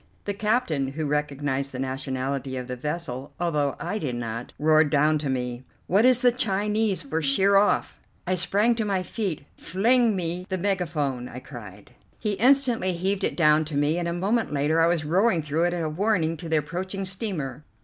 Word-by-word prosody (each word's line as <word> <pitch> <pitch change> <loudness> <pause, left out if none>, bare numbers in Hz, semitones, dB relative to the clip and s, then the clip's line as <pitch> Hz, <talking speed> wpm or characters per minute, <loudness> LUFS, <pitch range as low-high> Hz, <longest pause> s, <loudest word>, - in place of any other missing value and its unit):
The 205 - -1
captain, 200 - 0
who 155 +1 -3
recognized 145 -2 -1
the 130 - -6
nationality 130 0 -3
of 125 - -4
the 125 0 -5
vessel, 145 -1 -5
although 150 -5 0
I 190 +5 -3
did 130 -8 -3
not, 115 0 -5
roared 155 0 +4
down 150 +1 +3
to 145 -2 -3
me: 125 -1 -3 0.2
"What 200 +6 +3
is 255 0 +4
the 245 - +6
Chinese 210 -4 0
for 155 +3 -2
'Sheer 190 +8 +3
off?'" 200 +1 +2 0.3
I 185 - 0
sprang 205 +6 +2
to 225 - 0
my 195 -3 -1
feet. 185 -8 -4
"Fling 230 +4 +2
me 180 0 -3
the 190 - -1
megaphone," 160 -10 -1
I - - -9
cried. 105 -7 -11 0.3
He 215 - -2
instantly 240 -2 +3
heaved 190 +3 -1
it - - -1
down 155 -2 +4
to 150 -1 -6
me, 150 +4 +1
and 170 - -2
a - - -1
moment 205 +5 0
later 150 +3 +2
I 165 - +5
was 170 -3 0
roaring 180 +1 +2
through 155 +3 0
it 175 - 0
a 165 -2 -2
warning 165 0 0
to 165 -1 -7
the 160 - +3
approaching 185 +6 -3
steamer. 185 - -4
165 Hz, 190 wpm, -25 LUFS, 140-195 Hz, 0.3 s, the